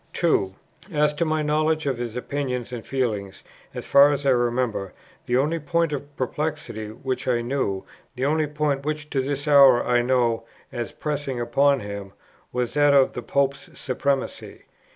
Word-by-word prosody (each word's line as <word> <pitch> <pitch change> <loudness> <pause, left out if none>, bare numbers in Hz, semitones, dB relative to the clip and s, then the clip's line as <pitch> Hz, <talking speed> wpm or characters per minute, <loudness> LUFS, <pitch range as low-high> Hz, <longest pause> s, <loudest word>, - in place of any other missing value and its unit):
"2. 100 - +1 0.4
As 150 -1 +2
to 170 +3 -1
my 155 -1 0
knowledge 155 +1 +1
of 135 -4 -1
his 120 -2 -4
opinions 125 -2 -3
and 115 -2 -5
feelings, 105 -8 -3 0.3
as - - -5
far 140 +1 +7
as 145 -1 -2
I 135 - +5
remember, 120 -5 0 0.3
the 125 - +2
only 155 +5 +1
point 165 0 0
of 145 0 -6
perplexity 135 -5 -3
which 130 +4 -4
I 120 -2 +2
knew, 120 -7 -1 0.3
the 130 +1 -1
only 155 +1 +1
point 150 -2 -1
which 155 +1 -4
to 135 - +1
this 140 +2 -3
hour 140 -4 +7
I 120 0 +3
know, 120 -2 +1 0.3
as 120 -3 -4
pressing 145 -4 -3
upon 140 +3 +2
him, 100 -1 -7 0.4
was 125 -1 -2
that 145 -1 +4
of 135 -1 +4
the 125 - -5
Pope's 140 +2 -1
supremacy. 135 +1 -2
135 Hz, 170 wpm, -24 LUFS, 120-150 Hz, 0.4 s, far